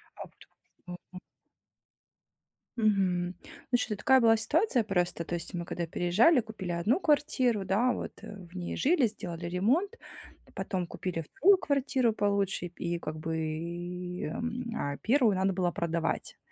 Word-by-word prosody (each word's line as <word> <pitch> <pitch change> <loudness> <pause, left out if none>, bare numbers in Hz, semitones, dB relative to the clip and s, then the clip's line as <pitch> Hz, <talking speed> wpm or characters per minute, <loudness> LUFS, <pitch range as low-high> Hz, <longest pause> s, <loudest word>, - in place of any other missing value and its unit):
А - - -7
вот 180 -1 -14
Мгм. 180 - -8 1.6
Мгм. 185 -5 +1 0.4
Ну, 245 - +5
щ 220 -3 -2
такая 265 +6 +4
была 225 -2 +5
ситуация 290 - +1
просто, 180 -4 -1
то 170 - -3
есть 170 +3 -6
мы 175 - -3
когда 175 - -3
переезжали, 190 - +4
купили 215 -5 -6
1 205 - +1
квартиру, 270 - +2
да 240 +6 +2
вот, - - -5
э, - - -9 0.2
в 185 - -15
ней 175 -1 -4
жили, 290 -3 +3
сделали 175 -5 -7
ремонт, 255 - +1 0.6
потом 185 -4 -2
купили 175 -1 -4
2 380 - +4
квартиру 270 -6 +1
получше, 200 -3 0
и 175 0 -4
как 155 -1 -5
бы, 160 +1 -3 0.9
м, 235 +6 -4
а, 140 0 -2
1 235 -4 +3
надо 190 +1 +1
было 180 -1 0
продавать. 170 -1 -2
200 Hz, 145 wpm, -30 LUFS, 175-245 Hz, 1.6 s, Ну